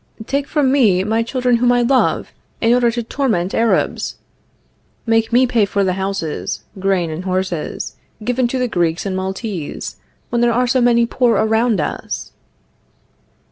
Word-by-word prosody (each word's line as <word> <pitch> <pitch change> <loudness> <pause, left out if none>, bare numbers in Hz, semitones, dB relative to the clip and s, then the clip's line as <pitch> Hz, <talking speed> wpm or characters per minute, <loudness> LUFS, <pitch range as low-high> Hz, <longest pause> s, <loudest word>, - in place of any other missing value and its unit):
Take 280 +3 -1
from 290 -4 +1
me 210 -10 +4
my 220 +3 +1
children 245 +1 +1
whom 245 +1 +3
I 245 0 +3
love, 260 +2 +1 0.3
in 230 +1 +3
order 245 -1 +3
to 235 0 -2
torment 220 -8 -1
Arabs! 230 0 +1 0.9
Make 225 0 +2
me 250 +2 +5
pay 240 -3 +2
for 200 0 0
the 185 -1 +1
houses, 190 -4 -3 0.2
grain 185 -4 0
and 160 +3 -5
horses, 185 -3 -3 0.3
given 245 +2 +1
to 260 - -2
the 250 -1 0
Greeks 170 -5 0
and 190 -1 -2
Maltese, 190 -3 -4 0.3
when 235 - +1
there 240 -1 +3
are 250 +2 +2
so 255 +1 +2
many 235 -1 +4
poor 240 0 +2
around 220 -1 +2
us! 150 - -4
230 Hz, 160 wpm, -18 LUFS, 190-245 Hz, 0.9 s, me